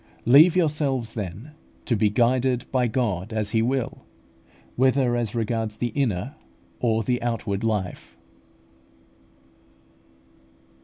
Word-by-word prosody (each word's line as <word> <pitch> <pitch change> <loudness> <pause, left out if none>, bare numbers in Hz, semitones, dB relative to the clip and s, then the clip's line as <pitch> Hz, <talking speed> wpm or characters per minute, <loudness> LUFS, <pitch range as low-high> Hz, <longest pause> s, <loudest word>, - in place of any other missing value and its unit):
Leave 150 +8 +7
yourselves, 145 -9 0
then, 105 - -6 0.3
to 120 - +1
be 105 0 +2
guided 125 +3 +1
by 125 -2 +2
God 110 -5 -2
as 105 -2 -2
He 110 -1 +2
will, 125 +1 -2 0.7
whether 130 -1 +2
as 120 -2 -2
regards 110 -1 -2
the 120 - -1
inner 125 - -2 0.4
or 115 -2 +1
the 125 +3 -1
outward 115 -4 -2
life. 105 -5 -3
120 Hz, 110 wpm, -24 LUFS, 110-130 Hz, 0.7 s, Leave